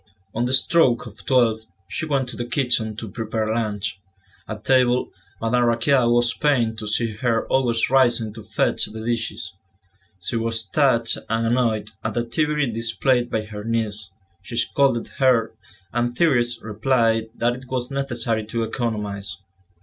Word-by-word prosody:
On 120 Hz, +2 st, 0 dB
the 125 Hz, -, -1 dB
stroke 130 Hz, -3 st, +3 dB
of 105 Hz, -3 st, -11 dB
twelve, 115 Hz, -4 st, +2 dB, 0.2 s
she 100 Hz, +11 st, -4 dB
went 135 Hz, -3 st, 0 dB
to -, -, -7 dB
the 120 Hz, -, -4 dB
kitchen 120 Hz, -5 st, +1 dB
to 110 Hz, +1 st, -6 dB
prepare 110 Hz, -1 st, -2 dB
lunch. 105 Hz, -4 st, -2 dB, 0.5 s
At 105 Hz, 0 st, -7 dB
table, 125 Hz, -1 st, +3 dB, 0.3 s
Madame 120 Hz, +2 st, +2 dB
Raquin 120 Hz, +2 st, +3 dB
was 120 Hz, 0 st, +3 dB
pained 120 Hz, -7 st, +1 dB
to 105 Hz, -, -6 dB
see 115 Hz, +2 st, 0 dB
her 115 Hz, -1 st, 0 dB
always 120 Hz, -4 st, +2 dB
rising 120 Hz, -5 st, +3 dB
to 110 Hz, -, -9 dB
fetch -, -, +1 dB
the 110 Hz, +1 st, -7 dB
dishes; 115 Hz, -6 st, -3 dB, 0.7 s
she 115 Hz, -, -2 dB
was 115 Hz, 0 st, -1 dB
touched 120 Hz, 0 st, +2 dB
and 115 Hz, 0 st, 0 dB
annoyed 115 Hz, -2 st, +1 dB
at 110 Hz, -1 st, -3 dB
the 120 Hz, -, +1 dB
activity 150 Hz, +5 st, 0 dB
displayed 120 Hz, +2 st, +1 dB
by 110 Hz, -, -1 dB
her 105 Hz, -1 st, -8 dB
niece; 110 Hz, -3 st, -2 dB, 0.3 s
she 120 Hz, -, -8 dB
scolded 120 Hz, +1 st, +1 dB
her, 125 Hz, -5 st, +3 dB, 0.4 s
and 120 Hz, 0 st, 0 dB
Thérèse 120 Hz, -8 st, +2 dB
replied 115 Hz, 0 st, +1 dB
that 120 Hz, +1 st, +1 dB
it 130 Hz, +1 st, -9 dB
was 125 Hz, 0 st, -3 dB
necessary 120 Hz, -5 st, -1 dB
to 115 Hz, +1 st, -2 dB
economise. 105 Hz, -4 st, -3 dB
115 Hz, 155 wpm, -22 LUFS, 110-125 Hz, 0.7 s, stroke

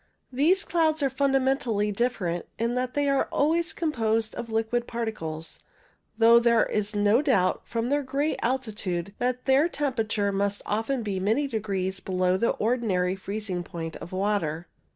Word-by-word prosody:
These 325 Hz, +9 st, +3 dB
clouds 315 Hz, -3 st, +1 dB
are 270 Hz, -, +1 dB
fundamentally 265 Hz, -6 st, +1 dB
different, 200 Hz, -6 st, -1 dB
in 230 Hz, +2 st, 0 dB
that 250 Hz, 0 st, -2 dB
they 290 Hz, 0 st, +1 dB
are 275 Hz, -1 st, +1 dB
always 330 Hz, +4 st, +1 dB
composed 225 Hz, -8 st, 0 dB
of 235 Hz, -, -6 dB
liquid 225 Hz, +2 st, -1 dB
particles, 165 Hz, -9 st, -5 dB, 0.6 s
though 230 Hz, +1 st, +7 dB
there 235 Hz, -1 st, +4 dB
is 210 Hz, 0 st, -2 dB
no 205 Hz, +4 st, +4 dB
doubt, 215 Hz, -11 st, +2 dB
from 230 Hz, +1 st, -2 dB
their 290 Hz, +1 st, +2 dB
great 280 Hz, +3 st, -1 dB
altitude, 210 Hz, -7 st, -2 dB
that 250 Hz, 0 st, -1 dB
their 275 Hz, +5 st, +4 dB
temperature 225 Hz, -9 st, -1 dB
must 200 Hz, +1 st, -1 dB
often 225 Hz, +4 st, -1 dB
be 200 Hz, -3 st, -2 dB
many 220 Hz, +10 st, +1 dB
degrees 195 Hz, -6 st, -2 dB
below 185 Hz, -1 st, 0 dB
the 230 Hz, +5 st, +1 dB
ordinary 210 Hz, -6 st, 0 dB
freezing 195 Hz, -2 st, -4 dB
point 165 Hz, -2 st, -6 dB
of 165 Hz, -, -10 dB
water. 185 Hz, -4 st, -1 dB
225 Hz, 150 wpm, -26 LUFS, 195-265 Hz, 0.6 s, though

